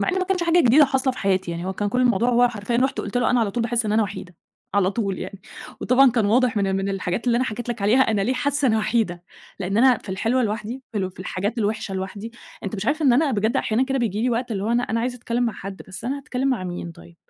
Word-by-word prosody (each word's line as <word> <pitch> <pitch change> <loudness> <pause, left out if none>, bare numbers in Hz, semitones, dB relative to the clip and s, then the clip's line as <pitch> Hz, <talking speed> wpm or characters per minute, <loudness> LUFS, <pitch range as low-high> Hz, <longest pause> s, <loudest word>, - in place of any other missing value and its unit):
مع - - 0
إنه 380 - +1
ما 370 - 0
كانش 370 -1 0
حاجة 340 +1 +3
جديدة 275 +2 +6
حاصلة 265 -1 0
في 255 - -10
حياتي 190 -2 0
يعني، 170 +1 -4
هو 190 - -2
كان 205 +2 -2
كل 250 +5 0
الموضوع 240 -2 +3
هو 245 0 +4
حرفيًا 225 0 -3
رُحت 265 +2 +1
قلت - - -5
له 245 - +2
أنا 245 -1 +3
على 215 - 0
طول 235 +4 -2
باحس 230 -1 0
إن 210 - 0
أنا 220 +1 +3
وحيدة، 185 -3 -6 0.4
على 195 -2 +3
طول 200 -3 -2
يعني، 190 +1 -7 0.4
وطبعًا 260 +1 +5
كان 230 -3 +1
واضح 240 +2 +2
من 200 -1 +1
ال 190 - 0
من 195 +1 -2
الحاجات 195 +3 -3
اللي 235 -1 +3
أنا 255 - +1
حكيت 240 0 -5
لك 235 -4 -3
عليها 220 +6 +4
أنا 220 -5 +2
ليه 245 - +1
حاسة 285 +2 +1
أنا 220 -1 +2
وحيدة، 215 -5 0 0.4
لإن 195 +2 -2
أنا 255 0 +5
في - - -16
الحلوة 225 +7 0
لوحدي، 225 +3 -3
في 215 - -2
ال 190 -1 -2
في 185 - -13
الحاجات 200 +5 -3
الوحشة 210 -2 -2
لوحدي، 200 +4 -5 0.3
أنت 200 +2 -3
مش 200 +2 -4
عارف 310 +3 0
إن 270 -4 +5
أنا 280 +4 +3
بجد 220 -1 0
أحيانًا 230 +4 +1
كده 270 0 -1
بييجي 220 -3 -1
لي 250 - +1
وقت، 240 0 -2
اللي 195 -2 -3
هو 210 - -2
أنا 240 +1 +2
أنا 230 -1 -1
عايزة 245 +1 -2
أتكلم 240 0 -1
مع 230 - 0
حد، 195 -1 -8
بس 190 - -9
أنا 270 +4 -2
هاتكلم 265 -1 -2
مع 235 -8 -1
مين 175 -1 -5
طيب؟! 170 +1 -16
230 Hz, 285 wpm, -23 LUFS, 200-250 Hz, 0.4 s, جديدة